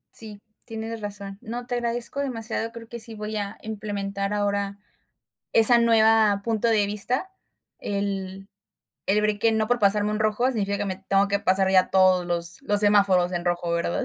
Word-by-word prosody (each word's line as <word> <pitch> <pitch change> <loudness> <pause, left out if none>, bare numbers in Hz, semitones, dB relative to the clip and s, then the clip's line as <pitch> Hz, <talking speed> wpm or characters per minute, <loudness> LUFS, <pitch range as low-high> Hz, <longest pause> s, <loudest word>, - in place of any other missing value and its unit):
Sí, 215 -3 -7 0.3
tienes 225 0 -6
razón. 200 -1 -7
No, 240 +2 -6
te 245 - -5
agradezco 240 +2 -3
demasiado, 230 -4 -3
creo 230 -1 -11
que 235 +1 -8
sí 225 0 -6
voy 215 0 -5
a 205 -1 -4
implementar 200 -2 -4
ahora 200 -1 -1 0.8
esa 230 +2 +6
nueva 220 -3 +4
punto 225 0 0
de 215 -2 +3
vista. 240 - -1 0.5
El 195 -1 -4 0.6
el 205 +2 +2
break 210 -1 0
que 225 +1 +3
no 220 0 0
por 245 0 +2
pasarme 210 0 +2
un 210 - -2
rojo 215 +3 +1
significa 200 -5 -1
que - - -3
me 190 -2 -3
tengo 195 +1 +3
que 200 0 +1
pasar 190 0 +2
ya 185 -1 +3
todos 185 -2 +3
los 170 +2 -3
los 205 -6 +4
semáforos 200 -4 +4
en 175 -1 -3
rojo, 175 -1 -1
¿verdad? 170 0 -1
205 Hz, 180 wpm, -24 LUFS, 195-225 Hz, 0.8 s, esa